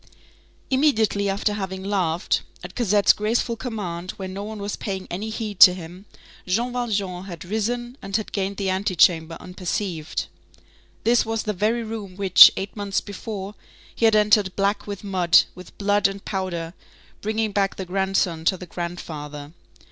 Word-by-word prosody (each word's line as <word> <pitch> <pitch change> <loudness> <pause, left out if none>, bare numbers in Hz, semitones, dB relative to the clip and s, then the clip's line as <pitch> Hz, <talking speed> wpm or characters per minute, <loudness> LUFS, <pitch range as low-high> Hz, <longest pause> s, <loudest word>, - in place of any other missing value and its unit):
Immediately 225 -8 +2
after 205 +2 0
having 190 -2 -4
laughed, 180 -4 0 0.2
at 180 +1 -8
Cosette's 210 -4 +4
graceful 230 +2 0
command, 190 -8 -5
when 190 -1 -6
no 200 +1 -5
one 215 +1 -6
was 200 0 -3
paying 190 -2 -5
any 200 +5 -3
heed 215 -3 -5
to 180 -2 +10
him, 180 +3 -10 0.4
Jean 235 +7 0
Valjean 200 -7 -2
had 170 -4 -8
risen 240 +6 -3
and 195 0 -5
had 215 -1 -1
gained 195 0 -2
the 195 -2 0
antechamber 175 -4 +2
unperceived. 180 -2 -4 0.8
This 235 +1 +4
was 225 0 -2
the 210 - -2
very 220 +5 0
room 215 -4 -6
which, 190 -2 +9
eight 195 +1 -4
months 200 -2 -1
before, 205 -1 -7 0.4
he 230 - +1
had 220 -1 +5
entered 210 -2 +3
black 200 +2 0
with 200 -1 -6
mud, 185 -4 +4
with 180 -1 -13
blood 205 0 +3
and 195 0 -8
powder, 175 -4 -3 0.5
bringing 215 0 -1
back 195 -1 0
the 190 - -5
grandson 190 -3 0
to 190 - +3
the 180 - -9
grandfather. 155 -4 -7
195 Hz, 160 wpm, -23 LUFS, 180-215 Hz, 0.8 s, to